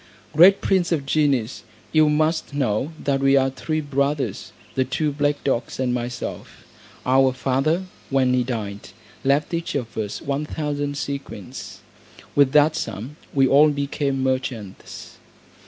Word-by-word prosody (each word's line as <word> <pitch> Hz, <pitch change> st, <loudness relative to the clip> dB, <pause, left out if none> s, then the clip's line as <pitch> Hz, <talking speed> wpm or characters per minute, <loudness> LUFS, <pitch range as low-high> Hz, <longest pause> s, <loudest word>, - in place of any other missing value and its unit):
Great 185 Hz, +5 st, +7 dB
prince 185 Hz, -3 st, +1 dB
of 150 Hz, -5 st, 0 dB
genies, 135 Hz, -5 st, +1 dB, 0.3 s
you 155 Hz, -1 st, +5 dB
must 155 Hz, -1 st, 0 dB
know 130 Hz, +1 st, 0 dB
that 140 Hz, -3 st, 0 dB
we 135 Hz, 0 st, +4 dB
are 135 Hz, 0 st, +2 dB
three 155 Hz, +4 st, -2 dB
brothers, 140 Hz, -5 st, -1 dB, 0.2 s
the 130 Hz, -, +2 dB
two 145 Hz, +4 st, -1 dB
black 145 Hz, 0 st, 0 dB
dogs 130 Hz, -3 st, -1 dB
and 125 Hz, -2 st, +1 dB
myself. 125 Hz, 0 st, -5 dB, 0.4 s
Our 130 Hz, +1 st, +4 dB
father, 135 Hz, +7 st, 0 dB, 0.3 s
when 130 Hz, -2 st, +2 dB
he 125 Hz, -1 st, +2 dB
died, 105 Hz, -5 st, -5 dB, 0.3 s
left 140 Hz, +4 st, +1 dB
each 170 Hz, -2 st, -2 dB
of 120 Hz, -5 st, -3 dB
us 105 Hz, -2 st, -3 dB
one 140 Hz, +2 st, -3 dB
thousand 145 Hz, -2 st, -3 dB
sequins. 135 Hz, -4 st, -6 dB, 0.5 s
With 140 Hz, -2 st, +4 dB
that 150 Hz, +1 st, +5 dB
sum, 120 Hz, -, -5 dB, 0.2 s
we 135 Hz, -1 st, +3 dB
all 145 Hz, +3 st, +6 dB
became 140 Hz, -1 st, -1 dB
merchants. 130 Hz, -7 st, -4 dB
140 Hz, 140 wpm, -23 LUFS, 130-150 Hz, 0.5 s, Great